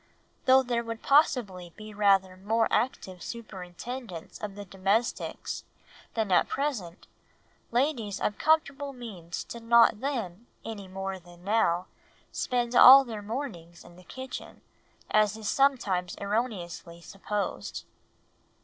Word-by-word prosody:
Though 260 +1 +6
there 240 -2 -1
would 230 -1 -6
possibly 205 - +2
be 215 0 -9
rather 195 -2 +3
more 220 +4 +1
active 190 -7 -1
superintendence 205 -1 -7
of 205 -2 -5
the 205 0 -8
domestics 195 +5 -1 0.5
than 220 -4 0
at 180 - +4
present, 225 -12 -3 0.6
ladies 235 -5 0
of 210 - -1
comfortable 290 -3 +1
means 195 -9 -7
did 235 - -9
not 230 -2 +5
then, 235 -6 -4 0.2
any 205 -4 -6
more 190 0 -5
than 175 0 -17
now, 185 -4 +2 0.5
spend 245 -1 -1
all 265 +2 +10
their 220 -4 -6
mornings 205 - -6
in 175 - -15
the 180 - -15
kitchen, 260 +7 -8 0.5
as 215 0 +3
is 220 -2 -6
sometimes 205 -10 +1
erroneously 200 -6 -3
supposed. 195 +3 -4
215 Hz, 120 wpm, -28 LUFS, 185-245 Hz, 0.6 s, all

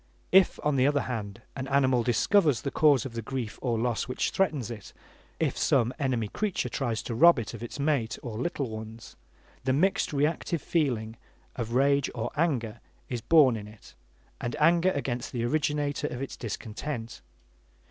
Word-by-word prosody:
If, 190 -1 +5
on 150 -2 +1
the 130 +1 +4
other 145 -1 +2
hand, 105 -6 -5
an 130 -1 -4
animal 130 -3 +3
discovers 130 - +3
the 140 - -2
cause 145 -4 +4
of 130 - -6
the 115 - -4
grief 115 -2 -5
or 120 -3 0
loss 120 0 -1
which 125 - -1
threatens 150 - 0
it; 105 -4 -9 0.5
if - - 0
some 120 +2 +2
enemy 125 -6 0
creature 205 - -2
tries 115 -5 -2
to 120 - -4
rob 170 +8 +6
it 115 -1 -4
of 115 - -8
its 120 +4 -7
mate 140 -6 0
or 120 -3 -5
little 140 -1 -2
ones, 110 0 -9 0.5
the 130 0 +1
mixed 185 +8 +2
reactive 150 +3 0
feeling 120 -9 -1 0.4
of 115 -2 -4
rage 140 +1 +3
or 115 - -3
anger 125 -9 0 0.3
is 120 -2 -3
born 145 -6 +5
in 105 -2 -7
it, 105 0 -15 0.5
anger 165 +9 +3
against 125 -3 -3
the 120 -2 -2
originator 145 +2 0
of 125 - -6
its 135 - -5
discontent. 115 +2 -6
130 Hz, 170 wpm, -28 LUFS, 115-145 Hz, 0.5 s, rob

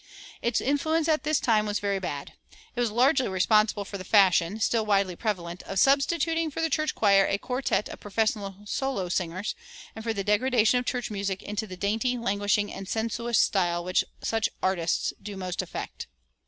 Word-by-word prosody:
Its 235 -1 +1
influence 315 +4 +1
at 310 -1 +2
this 305 -1 +1
time 215 -3 +2
was 205 0 0
very 200 -1 -1
bad. 145 -6 -5 0.4
It - - -4
was 240 -2 +2
largely 255 +4 +3
responsible 205 +2 +2
for 200 0 -7
the - - -6
fashion, 190 0 +4
still 225 +1 +1
widely 200 -3 +1
prevalent, 180 -4 -3
of 195 - -6
substituting 315 - +2
for 300 - -6
the 325 -1 0
church 310 -1 0
choir 200 -2 +4
a 200 - +1
quartet 250 0 -1
of - - -9
professional 205 -1 -1
solo 230 -5 -2
singers, 180 +3 -2 0.4
and 220 - -7
for 225 - -1
the 200 -3 -2
degradation 225 +3 +3
of 245 - -6
church 245 -3 -2
music 200 -2 -3
into 210 +1 -4
the 185 -1 -8
dainty, 220 +6 0
languishing, 205 -2 0
and 195 0 -7
sensuous 230 +1 -1
style 175 -3 +2
which 180 +1 +1 0.2
such 225 -1 0
"artists" 175 -3 0
do 200 -1 -7
most 185 -1 -3
affect. 185 - -7
210 Hz, 180 wpm, -27 LUFS, 195-245 Hz, 0.4 s, fashion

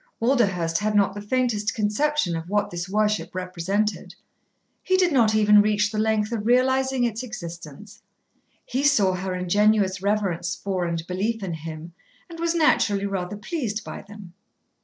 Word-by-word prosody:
Walderhurst 195 -10 +1
had 210 0 -1
not 200 -1 +3
the 205 - -7
faintest 225 -1 -1
conception 215 - 0
of 165 +1 -6
what 205 0 0
this 175 +1 -5
worship 210 -1 0
represented. 185 +3 -2 0.7
He 375 - +1
did 365 -2 +3
not 225 -5 +3
even 210 -1 +6
reach 205 0 +1
the 215 - -2
length 215 0 +1
of 220 -2 -3
realising 260 +1 +2
its 230 -1 -1
existence. 170 - -9 0.6
He 260 +2 -2
saw 225 -10 +3
her 185 0 -3
ingenuous 195 +1 +2
reverence 195 -4 -1
for 190 -3 -2
and 165 -1 -3
belief 200 +5 -2
in 180 -3 -3
him, 160 +1 -8 0.4
and 335 - -9
was 335 0 0
naturally 210 -11 +2
rather 195 0 -3
pleased 220 -2 -3
by - - -7
them. 200 -3 -13
210 Hz, 160 wpm, -24 LUFS, 185-225 Hz, 0.7 s, even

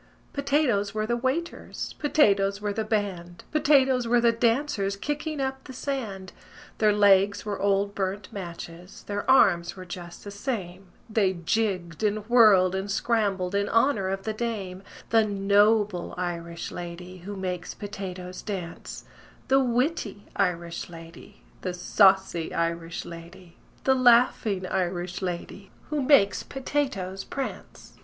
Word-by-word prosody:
"Potatoes 275 -8 +1
were 215 0 0
the 235 +2 0
waiters, 265 +8 -3
Potatoes 200 -10 +3
were 205 -1 -2
the 220 - -1
band, 190 -5 -3
Potatoes 270 -5 +3
were 240 +1 +4
the 235 0 +4
dancers 230 -3 0
Kicking 295 +6 -3
up 265 0 -2
the 260 - -9
sand: 235 -8 -4 0.5
Their 215 -1 +5
legs 200 -1 +4
were 205 -2 -3
old 200 0 +1
burnt 195 0 -3
matches, 175 -1 -8
Their 205 0 -4
arms 175 -9 +4
were 185 -1 -9
just 175 -1 -9
the 205 - -7
same, 195 -4 -5 0.2
They 215 -4 +2
jigged 180 -1 -1
and 210 0 0
whirled 210 -7 +6
and 190 +1 -3
scrambled 200 -4 0
In 200 0 0
honor 230 -5 +2
of 195 0 -3
the 220 - -2
dame: 210 -5 -4 0.3
The 225 -1 +5
noble 205 -1 +2
Irish 170 -2 -4
lady 180 +1 -8
Who 200 +4 -7
makes 180 -2 -4
potatoes 185 -3 -7
dance, 185 -5 -6 0.4
The 270 0 +5
witty 245 - -1
Irish 170 -4 -1
lady, 165 -1 -13 0.2
The 185 -1 -3
saucy 190 -2 +3
Irish 170 0 -2
lady, 170 +1 -11 0.3
The 265 - +4
laughing 235 -6 +4
Irish 180 -1 -2
lady 185 +2 -5 0.2
Who 300 -1 0
makes 255 -7 +4
potatoes 260 -9 -3
prance. 275 -1 -7
200 Hz, 135 wpm, -26 LUFS, 180-230 Hz, 0.5 s, whirled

